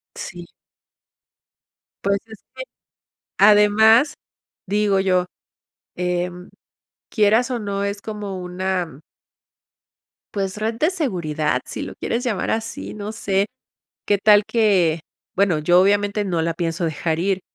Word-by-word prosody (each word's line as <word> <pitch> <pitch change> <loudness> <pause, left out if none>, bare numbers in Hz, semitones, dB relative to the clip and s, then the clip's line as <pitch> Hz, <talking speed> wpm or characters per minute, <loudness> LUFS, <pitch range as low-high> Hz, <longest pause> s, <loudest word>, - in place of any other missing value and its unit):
Sí. 175 -2 -8 1.6
Pues, 200 0 +2
es 220 -2 -14
que, 260 - -6 0.7
además, 215 +6 +5 0.5
digo 200 0 +1
yo, 185 -2 +1 0.7
em, 180 0 -3 0.6
quieras 220 +3 +3
o 250 - -1
no, 200 -2 -3
es 200 0 -3
como 205 -3 -6
una 180 -4 -3 1.3
pues, 195 -1 -3
red 220 +2 -2
de 305 +8 +2
seguridad, 155 - -1
si - - -6
lo - - -7
quieres 235 +2 -2
llamar 215 -6 -1
así, 225 +1 -4
no 210 0 -5
sé, 200 -3 0 0.6
qué 205 - +3
tal 210 0 +5
que, 190 -8 +2 0.4
bueno, 195 -5 +2
yo, 175 +4 +4
obviamente, 205 +1 +2
no 175 -4 -1
la 165 0 -1
pienso 170 0 -2
dejar 160 +1 -2
ir, 190 +1 0
200 Hz, 125 wpm, -21 LUFS, 180-215 Hz, 1.6 s, además